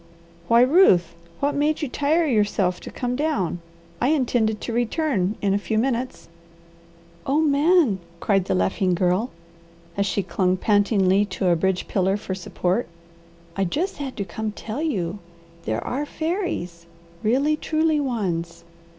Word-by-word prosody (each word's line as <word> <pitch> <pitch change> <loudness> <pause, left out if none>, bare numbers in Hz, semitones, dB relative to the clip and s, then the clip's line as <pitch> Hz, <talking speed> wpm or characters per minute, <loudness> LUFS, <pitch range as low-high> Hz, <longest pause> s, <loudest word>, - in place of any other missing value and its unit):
"Why 230 +4 +5
Ruth, 245 - +5 0.3
what 285 +1 +1
made 300 +2 0
you - - 0
tire 300 +6 +1
yourself 205 - +1
to - - -9
come 245 0 -3
down? 250 - -1 0.4
I 245 - +3
intended 245 -7 +1
to 235 - -4
return 235 - 0
in 195 -1 +2
a 200 - +1
few 215 +2 -2
minutes." 250 +1 -1 1.0
"Oh 280 +3 +2
Man!" 300 - +3 0.2
cried 195 -2 +1
the 190 - 0
laughing 185 0 +1
Girl, 185 +6 +1 0.7
as 200 0 0
she 200 +1 0
clung 185 -1 0
pantingly 200 -1 +3
to 185 -2 -1
a 175 - +4
bridge 185 +2 0
pillar 190 0 +1
for 205 -2 -5
support, 185 +3 -2 0.7
"I 195 - 0
just 320 - -2
had 275 -3 -6
to 200 - -2
come 215 +4 -4
to - - -12
tell 225 +7 -4
you. 200 - -2 0.5
There 110 +2 -2
are 285 +4 -2
fairies! 315 - -3 0.3
Really 275 +8 +2
truly 315 0 +1
ones! 190 -11 -2
220 Hz, 150 wpm, -23 LUFS, 190-285 Hz, 1.0 s, Why